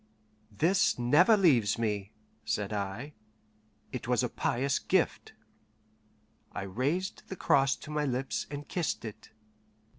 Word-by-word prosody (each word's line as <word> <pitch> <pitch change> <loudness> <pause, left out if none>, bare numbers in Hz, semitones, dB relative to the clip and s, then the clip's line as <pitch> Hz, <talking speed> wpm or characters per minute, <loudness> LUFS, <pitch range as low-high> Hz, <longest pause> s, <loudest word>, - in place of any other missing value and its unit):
"This 165 - +2
never 155 - +5
leaves 125 - +4
me," 105 -3 -2 0.3
said 105 -1 -2
I; 105 +8 -4 0.8
"it 125 -2 -5
was 125 0 +2
a 125 - 0
pious 135 +5 0
gift." - - 0 1.2
I - - -4
raised 140 - -2
the 190 - -4
cross 135 -6 +3
to 150 - -10
my 150 0 0
lips, 130 0 -2
and 145 0 -6
kissed 170 -8 -2
it. 110 - -9
130 Hz, 125 wpm, -30 LUFS, 110-150 Hz, 1.2 s, never